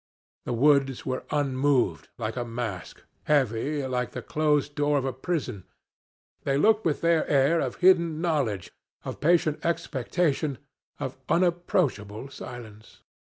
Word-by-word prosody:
The - - -2
woods 135 +1 +3
were 130 -1 -3
unmoved, 130 - +1
like 110 -1 -3
a 125 - -2
mask 115 -6 -5 0.2
heavy, 140 0 +1
like 125 -1 -2
the - - -5
closed 150 -2 +1
door 145 0 +1
of 135 - -1
a 135 - -1
prison 130 - -3 0.8
they 135 -1 +1
looked 215 +7 +3
with 150 - -1
their 170 -1 +2
air 145 +3 +3
of - - -2
hidden 170 -4 +5
knowledge, 145 - -1 0.3
of - - -5
patient 155 -2 +2
expectation, 150 -2 -1 0.4
of - - -4
unapproachable 165 - 0
silence. 115 -5 -10
140 Hz, 130 wpm, -27 LUFS, 120-155 Hz, 0.8 s, hidden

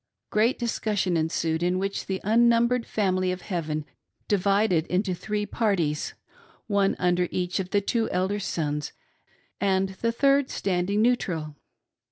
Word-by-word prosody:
Great 225 +5 +2
discussion 210 -6 -1
ensued, 160 0 0
in 180 +1 +1
which 195 +1 -3
the 190 -1 -2
unnumbered 235 +2 +3
family 185 -3 +1
of 185 - -5
heaven 155 -5 -3 0.4
divided 200 -3 +2
into 185 +1 0
three 210 +4 -3
parties, 190 -9 -1 0.3
— - - -29
one 200 -2 +2
under 180 0 +1
each 180 0 -2
of 185 -1 -3
the 205 0 +2
two 225 +2 0
elder 190 +3 0
sons, 150 -6 -2 0.7
and 195 -1 +1
the 210 +5 -2
third 275 +3 +3
standing 195 +2 0
neutral. 165 -11 0
195 Hz, 140 wpm, -26 LUFS, 180-215 Hz, 0.7 s, unnumbered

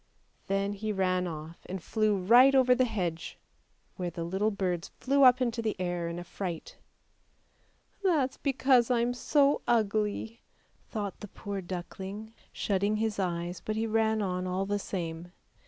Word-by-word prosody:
Then 195 +1 0
he 215 +2 -3
ran 185 -2 +1
off 160 0 -7
and 190 +1 -4
flew 215 +3 +1
right 240 +8 +6
over 255 -1 +6
the 255 +1 +3
hedge, 180 -8 -3 0.6
where 180 -1 -2
the 170 0 -5
little 190 +5 0
birds 185 -5 -2
flew 280 +2 +2
up 255 -1 +7
into 235 -1 -1
the 220 -2 -1
air 175 -2 -2
in 170 0 -4
a 175 - -5
fright. 175 -2 -6 0.6
" - - -39
That 305 -9 +2
is - - -18
because 260 -3 +3
I 240 -2 +3
am 240 +1 +1
so 280 +3 +2
ugly," 215 0 0 0.5
thought 205 -4 -4
the 210 - -8
poor 200 0 -6
duckling, 190 +4 -7 0.2
shutting 200 +1 0
his 215 -1 -1
eyes, 175 -1 -2
but 215 - -2
he 220 +1 0
ran 220 -1 +1
on 180 -1 -2
all 185 +2 -1
the 205 +1 -1
same. 175 -2 -5
205 Hz, 170 wpm, -29 LUFS, 180-230 Hz, 0.6 s, up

